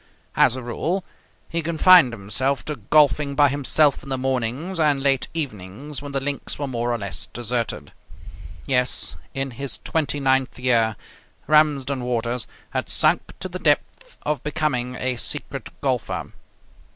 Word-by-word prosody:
As - - +4
a 130 - -6
rule, 170 +10 -2 0.4
he 170 - -2
confined 170 -2 +6
himself 115 +6 0
to 150 -2 -4
golfing 140 +4 +3
by 145 0 +5
himself 145 +1 +2
in 135 - -11
the 130 - -1
mornings 130 +7 -2
and 150 -3 +3
late 135 -1 +2
evenings 135 - -5
when 145 -1 -7
the 135 - 0
links 140 +1 -3
were 145 - -2
more 120 -2 -2
or 120 - 0
less 100 -2 -3
deserted. 120 +2 -3 0.7
Yes, 125 -1 0 0.2
in 135 0 -2
his 135 +1 -2
twenty 145 -3 -1
ninth 135 -1 +1
year, 115 -3 +2 0.5
Ramsden 145 -4 +2
Waters 120 0 -1 0.2
had - - -2
sunk - - +2
to - - -3
the - - -6
depth - - 0
of 150 -1 -1
becoming 145 -5 -1
a 125 0 -1
secret - - -2
golfer. - - -2
135 Hz, 150 wpm, -23 LUFS, 120-150 Hz, 0.7 s, confined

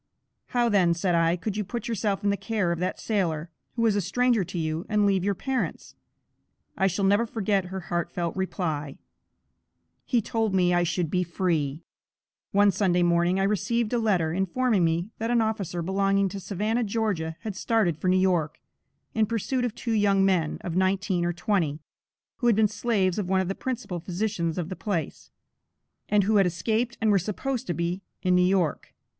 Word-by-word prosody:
"How 240 -1 +1
then," 185 -6 +3
said 180 +1 0
I, 165 0 +3
"could 205 +3 -4
you 210 - 0
put 235 +4 -5
yourself 210 -3 -1
in 200 - +2
the - - +1
care 205 -4 -1
of 170 - -2
that 180 +1 -2
sailor, 170 -6 -1 0.2
who 230 - 0
was 220 -3 +3
a 205 - +1
stranger 245 +2 +2
to 180 +1 -6
you, 160 0 -2
and 210 -1 +2
leave 195 -2 +2
your 200 0 +1
parents?" 265 +5 -3 0.8
I 195 - +2
shall 195 +2 0
never 205 +4 +3
forget 205 -4 0
her 190 +1 -5
heart 175 0 -2
felt 170 -2 -3
reply: 160 -7 -3 1.1
"He 245 - +1
told 220 -2 -1
me 180 -1 +3
I 175 - +3
should 170 -1 -1
be 180 - +2
free!" 165 -4 -1 0.7
One 205 0 +5
Sunday 180 -2 +2
morning, 175 +2 +2
I - - +2
received 210 +4 0
a 240 - +2
letter, 180 -8 +1
informing 195 +3 +1
me 170 +5 0
that 225 +1 -2
an 240 -1 +3
officer 200 -6 -1
belonging 195 +2 +1
to 200 - -6
Savannah, 210 +5 -1
Ga., 200 -7 -1
had 215 -4 -5
started 205 -5 +1
for 160 +5 -4
New 185 +1 +4
York, 180 -5 +1 0.5
in 220 -1 +2
pursuit 235 +3 -1
of 240 -2 -2
two 235 -1 -3
young 200 -2 +3
men, 175 -5 +1
of 170 - -4
nineteen 190 -1 +1
or 175 - +1
twenty, 170 -4 -1 0.6
who 240 - 0
had 235 - +5
been 215 0 +4
slaves 205 -3 0
of 185 -3 -3
one 190 0 +3
of 190 -1 -1
the - - 0
principal 240 -7 -4
physicians 180 -1 -2
of 175 -2 -3
the 185 - -4
place, 175 -9 -4 0.8
and 210 -1 +4
who 210 +2 +3
had 195 -2 +5
escaped 220 +7 -1
and 220 -2 +2
were 200 - +4
supposed 225 +7 -3
to 175 - -1
be 170 +2 -2 0.2
in 185 -1 +3
New 180 - +5
York. 180 -3 0
195 Hz, 195 wpm, -26 LUFS, 175-215 Hz, 1.1 s, One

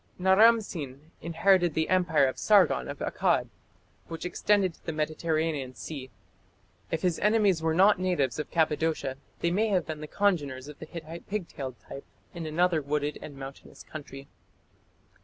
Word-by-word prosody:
Naram 215 +5 +6
Sin 150 -5 -8
inherited 175 0 +2
the 160 0 +1
Empire 175 -6 +3
of 130 - -2
Sargon 185 - +4
of - - -6
Akkad, - - +1 0.6
which 165 +1 -6
extended 190 +1 +2
to - - -25
the 160 - -3
Mediterranean 155 -3 -1
Sea. 135 -4 -7 0.8
If 160 - -2
his 180 -3 +1
enemies 210 -5 +3
were 160 0 +1
not 195 +2 +5
natives 165 -9 0
of 150 - -4
Cappadocia, 155 -4 0 0.2
they 170 - +1
may 210 +5 +2
have 185 -5 +1
been 155 -1 -6
the 155 - -6
congeners 145 -10 0
of 150 -1 -11
the 160 - -8
Hittite 165 +1 -9
pigtailed 165 - -4
type 140 - -8 0.3
in 170 -2 -5
another 165 +1 +2
wooded 145 +1 -2
and 145 -2 -9
mountainous 135 0 -10
country. 140 -3 -9
160 Hz, 160 wpm, -28 LUFS, 145-185 Hz, 0.8 s, Naram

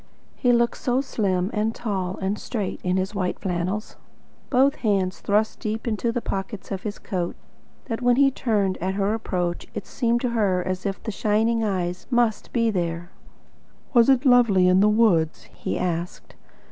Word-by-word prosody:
He 245 - +2
looked 235 0 +2
so 250 0 0
slim 195 -7 -1
and 220 +1 0
tall 190 -5 -3
and 195 +2 -2
straight 210 -6 -3
in 180 +1 +1
his 190 +2 -1
white 185 -3 -1
flannels, 185 +3 -3 0.5
both 270 +1 +3
hands 195 -4 0
thrust 210 +2 0
deep 220 +2 -3
into 230 +1 0
the 235 0 -3
pockets 195 +1 -5
of 190 -1 -3
his 210 0 -5
coat, 180 -4 -3 0.5
that 225 0 -4
when 245 0 +4
he 275 +1 +4
turned 210 -7 0
at 190 +2 -2
her 200 +1 +1
approach 180 -6 -2
it 215 - -4
seemed 235 -2 0
to 250 - 0
her 195 -6 +1
as 185 +1 -2
if 195 - -4
the 220 - -3
shining 220 +3 +1
eyes 185 -3 -2
MUST 240 -4 +1
be 230 -2 +2
there. 175 -2 -3 0.8
"Was 235 0 +5
it 265 +1 +4
lovely 230 -8 +5
in 185 +1 +5
the 210 +2 +5
woods?" 200 -8 +2
he - - -3
asked. 175 -1 -3
210 Hz, 175 wpm, -24 LUFS, 185-230 Hz, 0.8 s, Was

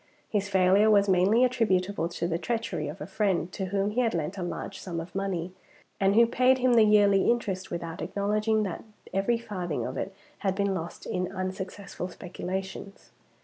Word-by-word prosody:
His 205 -1 -1
failure 190 +2 +4
was 200 -1 +5
mainly 195 +6 +4
attributable 200 -8 +1
to 170 0 -2
the 170 -1 -1
treachery 230 -8 -2
of 150 +6 -7
a - - -3
friend 190 -2 0
to 190 - -3
whom 200 +2 0
he 245 +4 +1
had 230 -5 +1
lent 165 +3 -2
a 190 - -5
large 180 +2 -5
sum 170 -3 -4
of 170 +2 -8
money, 185 -3 -2 0.5
and 195 +1 +3
who 235 +1 +7
paid 255 +2 +3
him 255 -1 +3
the 230 - +6
yearly 205 -2 +5
interest, 195 -6 -1
without 170 0 -5
acknowledging 215 +2 0
that 190 -5 -4 0.3
every 195 +5 +2
farthing 185 -8 -4
of - - -5
it 195 - -3 0.3
had 190 -2 0
been 200 0 +1
lost 170 -2 -6
in 180 0 -2
unsuccessful 190 0 -5
speculations. 190 +2 -6
195 Hz, 185 wpm, -28 LUFS, 180-210 Hz, 0.5 s, who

